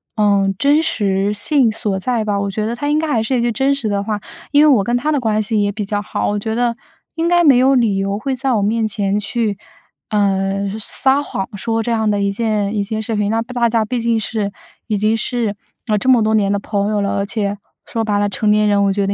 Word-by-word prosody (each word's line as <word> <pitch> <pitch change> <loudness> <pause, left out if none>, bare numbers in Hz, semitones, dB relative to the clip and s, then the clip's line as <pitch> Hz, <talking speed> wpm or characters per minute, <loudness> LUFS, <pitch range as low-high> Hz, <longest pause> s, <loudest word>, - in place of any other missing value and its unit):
呃， 200 -2 +3
真 290 +5 +3
实 200 -7 0
性 255 +4 +2
所 210 -3 -2
在 235 +2 -1
吧。 205 -2 -1
我 200 0 -2
觉 215 +2 -2
得 230 - -2
他 290 +4 -4
应 295 - +2
该 320 - 0
还 230 -5 +1
是 250 +3 0
一 - - +1
句 240 0 +1
真 270 +5 +1
实 240 -6 -2
的 200 -1 0
话。 210 0 -3 0.3
因 290 +1 +5
为 - - +6
我 - - +2
跟 240 +5 -1
他 300 +5 0
的 290 - +1
关 215 -3 0
系 215 0 0
也 205 0 0
比 210 +1 -3
较 205 +1 -2
好， - - -2
我 205 0 -1
觉 220 +2 -3
得 240 0 0 0.4
应 330 +1 0
该 345 0 +4
没 275 -5 +6
有 265 +2 +4
理 225 -6 +2
由 195 +1 -1
会 270 +5 -2
在 260 0 -1
我 215 - +1
面 220 +2 +1
前 200 -1 -1
去， 210 -1 -2 0.5
呃， 195 -1 0
撒 265 +6 +2
谎 195 -8 -4
说 225 +2 -1
这 235 - -2
样 220 -2 +1
的 205 -1 0
一 200 0 +1
件 210 -1 -1
一 - - +1
件 220 +1 -3
事情。 210 -2 -1
那 225 +1 +1
不 240 +2 -8
大 240 -1 +2
家 230 -1 +1
毕 245 +2 -2
竟 230 0 +1
是 210 -2 -2 0.4
已 215 - 0
经 215 +2 +1
是， 230 -2 -2 0.3
呃， 215 - +2
这 205 - -3
么 250 -4 +5
多 220 0 +1
年 205 -2 +2
的 200 - +1
朋 200 0 -2
友 210 -1 0
了， 200 - 0
而 200 - 0
且 200 -1 -2 0.3
说 225 -1 -2
白 205 -2 0
了， 205 0 +1
成 210 +1 -1
年 210 0 +3
人 200 -1 +3
我 195 - +2
觉 200 0 0
得 200 - 0
215 Hz, 285 characters per minute, -18 LUFS, 200-240 Hz, 0.5 s, 为